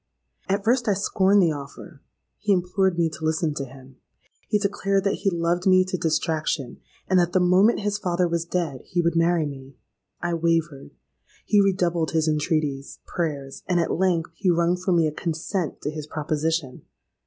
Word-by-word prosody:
At 200 +1 0
first 240 +2 +2
I 205 - +3
scorned 195 0 +3
the 165 - +3
offer: 145 +1 -9 0.4
he 210 - 0
implored 185 0 +1
me 170 -1 +3
to 160 0 -10
listen 155 0 0
to 140 -1 -4
him; 130 0 -15 0.5
he 210 - +2
declared 200 -1 0
that 200 - 0
he 195 - +2
loved 175 +1 0
me 185 0 +5
to 185 - -3
distraction, 160 -4 -1 0.3
and 185 -1 +4
that 175 0 +1
the 185 - +4
moment 185 +6 +4
his 205 0 -1
father 180 -2 0
was 170 -1 -1
dead 170 -6 -3
he 180 - -3
would 170 -1 +1
marry 165 -1 +2
me. 135 -2 -9 0.4
I 175 0 -2
wavered—he 165 - -2
redoubled 175 -4 +1
his 160 -1 +1
entreaties, 150 -3 -1
prayers; 145 -6 -4
and 180 -1 +2
at 165 - 0
length 175 -2 0
he 185 +3 -1
wrung 170 0 +2
from 180 0 0
me 165 -1 +3
a 155 - 0
consent 165 +2 -3
to 150 - -3
his 155 -1 -7
proposition! 155 -2 -2
170 Hz, 175 wpm, -24 LUFS, 155-185 Hz, 0.5 s, me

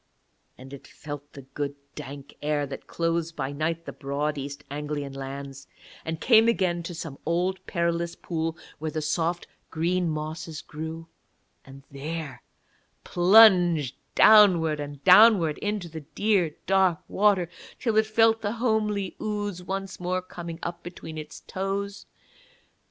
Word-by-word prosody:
And 130 +2 -12
it 140 - -11
felt 145 -1 -9
the 140 - -10
good 140 +2 -5 0.2
dank 140 -1 -9
air 150 -1 0
that 135 -1 -8
clothes 165 0 -1
by 140 -4 -4
night 160 +3 -2
the - - -7
broad 145 +2 -2
East 140 +1 -6
Anglian 145 -1 -4
lands, 135 0 -7 0.4
and 160 0 -4
came 225 +1 +5
again 185 -7 +1
to 170 +1 -7
some 160 -4 -7
old 180 +3 -1
perilous 170 -1 -1
pool 165 -2 -3 0.2
where 155 +1 -3
the 155 0 -3
soft 165 +2 -1 0.2
green 170 +2 0
mosses 155 +1 -5
grew, 160 +2 -7 0.6
and 135 0 -13
there 140 -2 -6 0.6
plunged 175 - +5 0.2
downward 180 -8 +6
and 145 -1 -7
downward 185 -5 +6
into 205 -3 -2
the 160 -1 -8
dear 180 +1 0
dark 190 -2 +3
water 195 -3 +2 0.3
till 230 -4 0
it 220 0 +4
felt 225 +1 +3
the 205 0 -2
homely 215 -5 0
ooze 205 -3 -3
once 195 +1 -5
more 180 +1 -2
coming 170 -2 -7
up 170 0 -4
between 160 -2 -8
its 150 0 -9
toes. 195 +1 -4
165 Hz, 140 wpm, -26 LUFS, 150-190 Hz, 0.6 s, downward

